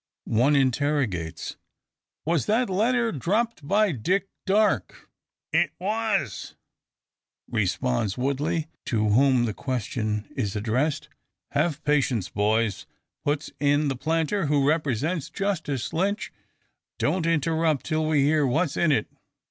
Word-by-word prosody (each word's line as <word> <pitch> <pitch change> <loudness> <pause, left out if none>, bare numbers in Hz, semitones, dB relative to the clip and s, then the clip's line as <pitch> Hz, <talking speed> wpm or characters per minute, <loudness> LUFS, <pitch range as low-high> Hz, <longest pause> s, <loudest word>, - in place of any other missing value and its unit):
One 125 +7 +3
interrogates, 130 - 0 0.7
"Was 165 -2 +1
that 225 0 +2
letter 230 +4 +2
dropped 200 - -1
by 205 +3 +3
Dick 185 - 0 0.2
Darke?" 210 +2 +1 0.5
"It - - +2
was," 205 - -2 0.9
responds 95 - 0
Woodley, 140 +5 0 0.2
to 110 -2 +1
whom 125 +2 +4
the 110 - -2
question 110 -4 -3
is 105 -7 -2
addressed. 125 +8 0 0.4
"Have 155 0 0
patience, 130 -9 +1
boys!" 105 0 0 0.4
puts 145 +1 -1
in 145 +1 +2
the 135 - -1
planter, 160 +5 0
who 140 -1 +2
represents 150 +1 0
Justice 165 - -2
Lynch; 195 +5 -1 0.6
"don't 175 -3 0
interrupt 160 -2 +1
till 155 0 0
we 150 -3 +3
hear 150 +1 +3
what's 155 +4 +1
in 170 -3 +3
it." 115 -7 +2
145 Hz, 115 wpm, -25 LUFS, 125-170 Hz, 0.9 s, whom